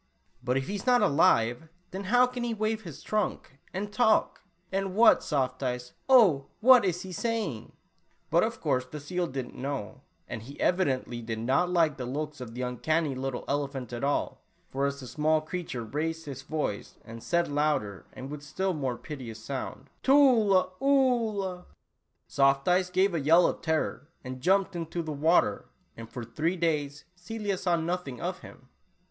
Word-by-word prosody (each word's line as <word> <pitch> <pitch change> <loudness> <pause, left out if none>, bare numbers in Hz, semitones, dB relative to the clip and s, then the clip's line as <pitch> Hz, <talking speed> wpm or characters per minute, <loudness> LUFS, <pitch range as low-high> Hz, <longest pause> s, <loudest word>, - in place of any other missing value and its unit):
" 70 - -37
But, 125 +1 +1
if 135 - -1
he - - -4
is 205 +4 -5
not 245 -3 +5
alive, 140 - +3 0.2
then 195 +2 -5
how 245 +5 +5
can 250 -1 -5
he 235 -1 -2
wave 215 +1 -1
his 165 -8 -10
trunk 210 -9 -2
and 205 +2 -4
talk? 220 -2 +2 0.3
And 195 -1 -2
what, 230 +2 +6
Soft 130 -4 -1
Eyes, 125 -1 -3 0.2
oh, 195 - +6
what 250 0 +7
is 180 -2 -1
he 190 - -8
saying?" 200 - -3 0.6
But - - +5
of - - -2
course 130 0 +1
the 130 +4 -9
seal 175 +5 -2
did 130 -4 -5
n't - - -16
know, 135 -5 -4 0.3
and 110 - -6
he 135 +6 -11
evidently 130 -9 0
did 115 -1 -4
not 135 +10 +1
like 165 -5 +2
the 125 -2 -5
looks 150 +2 -4
of 115 -2 -8
the 125 - -3
uncanny 150 +5 0
little 130 -1 -4
elephant 140 -4 -3
at 120 - -5
all, 140 +1 -1 0.3
for 140 +1 0
as 140 0 -4
the 130 - -8
small 155 +5 +1
creature 155 -6 -5
raised 160 +8 -3
his 135 -3 -7
voice, 145 -7 -4
and 115 0 -9
said 170 +5 +1
louder 145 -10 -1
and 135 +2 -8
with 150 -1 -6
still 185 +6 -2
more 135 -6 -2
piteous 130 -8 -8
sound, 135 0 -5
"Tula 230 -10 +5
Oolah," 230 -9 +1 0.6
Soft 135 0 +2
Eyes 180 0 +3
gave 190 +1 +2
a 165 - 0
yell 165 +5 +5
of - - -1
terror, 160 -4 -1 0.3
jumped 190 +6 +2
into 170 0 -3
the 155 - -5
water, 160 +5 +2 0.3
and 115 0 -9
for 120 - -6
three 155 +10 -1
days 150 -4 -1
Celia 205 +2 -3
saw 180 -1 +1
nothing 165 -6 -3
of - - -3
him - - -14
155 Hz, 180 wpm, -28 LUFS, 135-190 Hz, 0.6 s, what